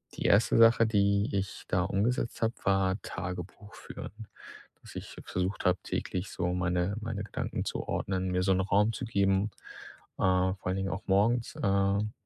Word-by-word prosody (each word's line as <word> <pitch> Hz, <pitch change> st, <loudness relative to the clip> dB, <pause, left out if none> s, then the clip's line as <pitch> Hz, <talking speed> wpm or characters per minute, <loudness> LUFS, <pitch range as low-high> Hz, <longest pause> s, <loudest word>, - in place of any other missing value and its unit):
die -, -, -4 dB
1. 105 Hz, +3 st, +4 dB
Sache, 115 Hz, 0 st, +6 dB
die 100 Hz, -1 st, +2 dB
ich 95 Hz, -1 st, -3 dB
da 90 Hz, 0 st, +2 dB
umgesetzt 105 Hz, +5 st, -1 dB
habe, 115 Hz, 0 st, +1 dB
war 95 Hz, 0 st, +2 dB
Tagebuch 90 Hz, +3 st, -6 dB
führen. 105 Hz, +1 st, -9 dB, 0.5 s
Dass -, -, -13 dB
ich -, -, -7 dB
versucht 90 Hz, +2 st, -2 dB
habe, 90 Hz, 0 st, +3 dB
täglich 95 Hz, +1 st, -3 dB
so 90 Hz, 0 st, -1 dB
meine 90 Hz, +1 st, 0 dB
meine 105 Hz, -2 st, -4 dB
Gedanken 105 Hz, -, -4 dB
zu -, -, -4 dB
ordnen, 95 Hz, -1 st, -1 dB
mir 90 Hz, 0 st, +1 dB
so 95 Hz, -, +2 dB
'n 95 Hz, -, +1 dB
Raum 105 Hz, +3 st, +2 dB
zu 125 Hz, -, -4 dB
geben, 100 Hz, -2 st, +2 dB, 0.7 s
äh, -, -, -3 dB
vor 95 Hz, +1 st, +2 dB
allen 90 Hz, -, 0 dB
Dingen 95 Hz, 0 st, -1 dB
auch 100 Hz, -, -4 dB
morgens, 110 Hz, +5 st, +2 dB
ähm, 100 Hz, +1 st, +2 dB
100 Hz, 170 wpm, -30 LUFS, 95-105 Hz, 0.7 s, Sache